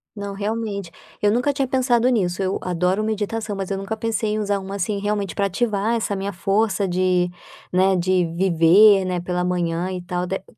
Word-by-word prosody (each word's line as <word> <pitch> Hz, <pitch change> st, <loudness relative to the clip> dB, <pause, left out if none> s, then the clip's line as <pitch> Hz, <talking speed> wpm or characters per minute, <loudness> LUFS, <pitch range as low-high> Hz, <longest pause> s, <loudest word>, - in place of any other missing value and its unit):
Não, 200 Hz, -1 st, -5 dB
realmente. 205 Hz, -2 st, -3 dB, 0.3 s
Eu 205 Hz, -, +3 dB
nunca 245 Hz, +6 st, +1 dB
tinha 270 Hz, -1 st, -1 dB
pensado 250 Hz, -2 st, +2 dB
nisso, 190 Hz, -6 st, 0 dB
eu 190 Hz, 0 st, 0 dB
adoro 180 Hz, +3 st, 0 dB
meditação, 215 Hz, 0 st, -2 dB
mas 195 Hz, -1 st, -4 dB
eu 195 Hz, -, -2 dB
nunca 195 Hz, +3 st, -4 dB
pensei 220 Hz, -1 st, -1 dB
em 215 Hz, -, -1 dB
usar 205 Hz, -1 st, 0 dB
uma, 195 Hz, +1 st, -6 dB
assim, 200 Hz, +1 st, -2 dB
realmente 205 Hz, -1 st, -2 dB
para 200 Hz, -, +1 dB
ativar 210 Hz, +2 st, 0 dB
essa 220 Hz, -3 st, -1 dB
minha 195 Hz, +1 st, -4 dB
força 195 Hz, +2 st, 0 dB
de, 180 Hz, 0 st, +1 dB, 0.4 s
né, 190 Hz, +1 st, +3 dB
de 180 Hz, 0 st, +2 dB
viver, 190 Hz, +3 st, +5 dB
né, 180 Hz, -1 st, -1 dB
pela 180 Hz, 0 st, -2 dB
manhã 175 Hz, 0 st, -1 dB
e 180 Hz, -1 st, -4 dB
tal, 180 Hz, 0 st, -3 dB
dé 190 Hz, +1 st, -4 dB
195 Hz, 195 wpm, -22 LUFS, 180-215 Hz, 0.4 s, viver